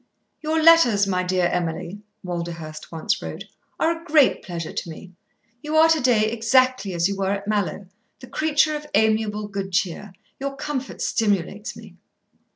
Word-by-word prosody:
"Your 315 Hz, +1 st, 0 dB
letters, 310 Hz, -11 st, +6 dB
my 185 Hz, -2 st, 0 dB
dear 180 Hz, 0 st, +1 dB
Emily," 175 Hz, +3 st, -2 dB, 0.2 s
Walderhurst 170 Hz, -3 st, -6 dB
once 160 Hz, -1 st, -1 dB
wrote, -, -, -6 dB, 0.4 s
"are 330 Hz, +1 st, +2 dB
a 330 Hz, -, -12 dB
great 305 Hz, -5 st, +3 dB
pleasure 170 Hz, -3 st, -6 dB
to -, -, -4 dB
me. 180 Hz, +3 st, -10 dB, 0.5 s
You 300 Hz, +1 st, -3 dB
are 320 Hz, +1 st, +6 dB
to 320 Hz, -2 st, +3 dB
day 220 Hz, -4 st, +3 dB
exactly 235 Hz, -3 st, +2 dB
as 170 Hz, +1 st, +2 dB
you 200 Hz, -, -3 dB
were 195 Hz, -1 st, -1 dB
at 200 Hz, 0 st, -3 dB
Mallowe, 200 Hz, -3 st, -1 dB, 0.3 s
the 260 Hz, -, -10 dB
creature 310 Hz, +2 st, +1 dB
of 300 Hz, 0 st, -6 dB
amiable 215 Hz, -1 st, +1 dB
good 195 Hz, -1 st, -5 dB
cheer. 185 Hz, +2 st, -2 dB, 0.3 s
Your 275 Hz, 0 st, -4 dB
comfort 270 Hz, -1 st, -4 dB
stimulates 205 Hz, -1 st, -1 dB
me." -, -, -13 dB
210 Hz, 160 wpm, -23 LUFS, 180-275 Hz, 0.5 s, letters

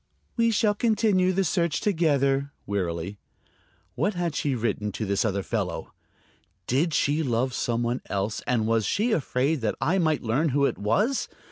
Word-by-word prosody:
"We 230 Hz, -1 st, +3 dB
shall 210 Hz, -1 st, +2 dB
continue 210 Hz, -4 st, +2 dB
the 195 Hz, +1 st, +1 dB
search 170 Hz, -2 st, 0 dB
together," 140 Hz, -, +1 dB
wearily. 95 Hz, -1 st, -3 dB, 0.7 s
What 190 Hz, -, 0 dB
had 175 Hz, -2 st, -1 dB
she 140 Hz, -2 st, -1 dB
written 105 Hz, -3 st, -1 dB
to 110 Hz, -, -3 dB
this 100 Hz, 0 st, +1 dB
other 100 Hz, -3 st, -1 dB
fellow? -, -, -3 dB, 0.7 s
Did 145 Hz, -, +1 dB
she 150 Hz, +3 st, +2 dB
love 125 Hz, -2 st, 0 dB
some 120 Hz, 0 st, -1 dB
one 120 Hz, +2 st, -1 dB
else 100 Hz, +2 st, -2 dB
and 120 Hz, -4 st, +1 dB
was 115 Hz, 0 st, +2 dB
she 225 Hz, +5 st, +1 dB
afraid 140 Hz, -, 0 dB
that 110 Hz, -2 st, 0 dB
I 165 Hz, +10 st, +1 dB
might 155 Hz, -4 st, +1 dB
learn 130 Hz, +8 st, +1 dB
who 140 Hz, +1 st, +2 dB
it -, -, -1 dB
was? 205 Hz, -, +1 dB
140 Hz, 165 wpm, -26 LUFS, 115-180 Hz, 0.7 s, We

